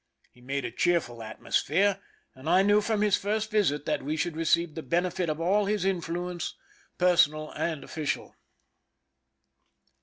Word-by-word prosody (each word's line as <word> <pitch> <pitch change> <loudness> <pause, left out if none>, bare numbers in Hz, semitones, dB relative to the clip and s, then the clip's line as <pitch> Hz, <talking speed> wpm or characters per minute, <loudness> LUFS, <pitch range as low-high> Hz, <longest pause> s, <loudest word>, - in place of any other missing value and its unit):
He 125 - -22
made 135 +1 -3
a - - -4
cheerful 120 -4 0
atmosphere, 185 - 0 0.3
and 130 +4 -7
I 185 +2 +5
knew 205 +1 +4
from 215 0 0
his 205 -1 +4
first 215 +2 -2
visit 150 -9 +1
that - - 0
we 150 +3 -3
should 170 0 -1
receive 165 0 +1
the 160 - -5
benefit 175 +1 0
of 155 0 -2
all 195 +5 +2
his 205 -2 0
influence, 175 -1 -2 0.4
personal 155 -4 +3
and 160 -4 -3
official. 155 -2 -4
170 Hz, 150 wpm, -28 LUFS, 155-195 Hz, 0.4 s, I